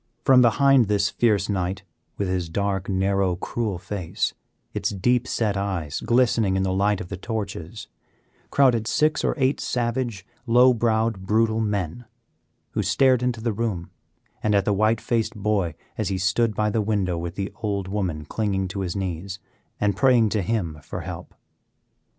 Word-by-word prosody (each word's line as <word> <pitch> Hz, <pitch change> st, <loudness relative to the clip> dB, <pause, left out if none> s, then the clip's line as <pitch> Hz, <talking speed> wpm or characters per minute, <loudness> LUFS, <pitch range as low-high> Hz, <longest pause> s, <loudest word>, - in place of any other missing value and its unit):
From 130 Hz, -1 st, +7 dB
behind 130 Hz, 0 st, +5 dB
this 100 Hz, -1 st, +1 dB
fierce 105 Hz, -4 st, +2 dB
knight, 95 Hz, -1 st, -2 dB, 0.3 s
with 100 Hz, -, -1 dB
his 90 Hz, -2 st, -2 dB
dark, 100 Hz, +1 st, -1 dB
narrow, 95 Hz, -1 st, +1 dB
cruel 105 Hz, +1 st, -3 dB
face, 90 Hz, -2 st, -3 dB, 0.4 s
its -, -, -1 dB
deep 120 Hz, +5 st, +1 dB
set 105 Hz, -3 st, 0 dB
eyes 95 Hz, -7 st, -2 dB
glistening 115 Hz, -5 st, +2 dB
in 95 Hz, -, +1 dB
the 95 Hz, -1 st, 0 dB
light 100 Hz, +1 st, +2 dB
of 90 Hz, -, -7 dB
the 95 Hz, -, -5 dB
torches, 100 Hz, -2 st, -5 dB, 0.6 s
crowded 120 Hz, -5 st, +3 dB
six 155 Hz, +5 st, +2 dB
or -, -, +1 dB
eight 135 Hz, 0 st, +1 dB
savage, 120 Hz, -5 st, -2 dB, 0.2 s
low 125 Hz, +2 st, +6 dB
browed, 110 Hz, -4 st, 0 dB
brutal 110 Hz, +1 st, +2 dB
men, 105 Hz, +1 st, -2 dB, 0.7 s
who -, -, -1 dB
stared 130 Hz, -3 st, +3 dB
into 125 Hz, -2 st, -1 dB
the 115 Hz, -1 st, -1 dB
room 100 Hz, -6 st, -3 dB, 0.5 s
and 105 Hz, -1 st, +2 dB
at 100 Hz, -, +2 dB
the 105 Hz, -, +2 dB
white 110 Hz, +2 st, +2 dB
faced 115 Hz, -2 st, -1 dB
boy 100 Hz, -6 st, 0 dB, 0.2 s
as -, -, 0 dB
he 95 Hz, -, -1 dB
stood 105 Hz, +4 st, +1 dB
by 105 Hz, 0 st, +1 dB
the 110 Hz, -, +1 dB
window 100 Hz, -4 st, 0 dB
with 85 Hz, 0 st, -5 dB
the 100 Hz, 0 st, -3 dB
old 100 Hz, -3 st, -2 dB
woman 90 Hz, -7 st, -2 dB
clinging 95 Hz, -2 st, -1 dB
to 100 Hz, -, -5 dB
his 90 Hz, -3 st, -3 dB
knees 95 Hz, 0 st, -4 dB, 0.4 s
and 100 Hz, -2 st, +1 dB
praying 120 Hz, -1 st, +4 dB
to 105 Hz, 0 st, 0 dB
him 85 Hz, -6 st, -2 dB
for 80 Hz, +5 st, -6 dB
help. 90 Hz, 0 st, -8 dB
105 Hz, 170 wpm, -24 LUFS, 95-115 Hz, 0.7 s, From